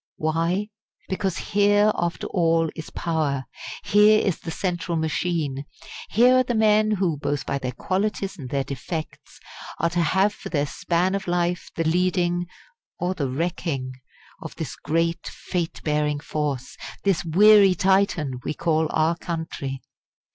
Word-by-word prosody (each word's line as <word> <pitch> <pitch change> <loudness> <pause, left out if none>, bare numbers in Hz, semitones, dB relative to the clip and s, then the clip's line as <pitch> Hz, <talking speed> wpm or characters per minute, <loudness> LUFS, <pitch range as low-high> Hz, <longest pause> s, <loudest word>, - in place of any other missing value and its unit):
Why? 165 +6 0 0.4
Because 190 -1 -1
here 205 +1 +3
after 170 0 -2
all 165 -2 +1
is 160 - -7
power 150 -5 -1 0.4
here 210 +1 +5
is 195 -5 0
the - - -7
central 175 0 -2
machine. 160 -3 -1 0.4
Here 245 +4 +5
are 255 - +4
the 245 -1 -2
men 215 -1 +4
who, 185 -7 0
both 145 -1 -2
by 140 - -2
their 125 -1 -3
qualities 195 - -2
and 135 -8 -8
their 140 +1 0
defects, 155 +4 -6 0.4
are 170 +1 0
to 175 +1 +1
have 190 +6 +2
for - - -9
their 145 -3 0
span 170 +4 0
of 195 -1 -3
life 175 0 -1
the 165 - 0
leading 175 +1 +1 0.5
or 180 +1 -1
the 140 -7 -2
wrecking? 145 -2 -2 0.5
of - - -8
this - - -5
great 165 +2 -1
fate 175 -3 -4
bearing 150 -1 0
force, 145 -4 -3 0.3
this 195 -4 +1
"weary 195 +3 +6
Titan" 190 -9 +1
we - - -3
call 160 -1 +1
our 160 +2 +2
country. 160 -6 -5
170 Hz, 145 wpm, -24 LUFS, 155-190 Hz, 0.5 s, weary